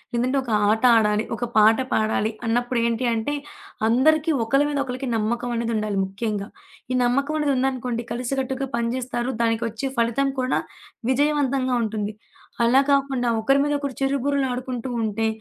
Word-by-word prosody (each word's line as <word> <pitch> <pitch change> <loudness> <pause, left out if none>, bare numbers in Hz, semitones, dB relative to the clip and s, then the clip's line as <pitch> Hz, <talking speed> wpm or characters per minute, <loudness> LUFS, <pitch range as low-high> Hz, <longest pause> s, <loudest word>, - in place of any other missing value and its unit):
లేదంటే 255 +3 +1
ఒక 240 - -5 0.2
ఆట 220 +2 +1
ఆడాలి, 210 0 +2
ఒక 240 - -3
పాట 220 +1 +6 0.2
పాడాలి 215 0 +1 0.2
అన్నప్పుడు 245 +1 0
ఏంటి 235 +2 -1
అంటే, 225 +6 -1 0.5
అందరికి 310 +7 +3
ఒకళ్ళ 275 +5 +2
మీద 285 -1 -1
ఒకళ్ళకి 255 0 -4
నమ్మకమనేది 235 +1 -1
ఉండాలి 215 -2 -1
ముఖ్యంగా. 200 +1 -3 0.4
ఈ 255 - +1
నమ్మకమనేది 280 +4 +1
ఉందనుకోండి, 250 -2 -1
కలిసికట్టుగా 265 +2 -2
పని 230 0 0
జేస్తారు 250 -1 -2
దానికొచ్చే 230 +2 -1
ఫలితం 235 +4 +1
కూడా, 255 0 +1 0.5
విజయవంతంగా 275 -2 +1
ఉంటుంది. 215 -1 -3 0.5
అలా 260 +4 +5
కాకుండా, 270 -3 +1
ఒకరి 275 +5 +3
మీద 290 - 0
ఒకరు 280 -3 -4
చిరు 275 +1 +1
బుర్రలాడుకుంటూ 255 -3 -1
ఉంటే, 220 +1 0
245 Hz, 140 wpm, -23 LUFS, 225-270 Hz, 0.5 s, పాట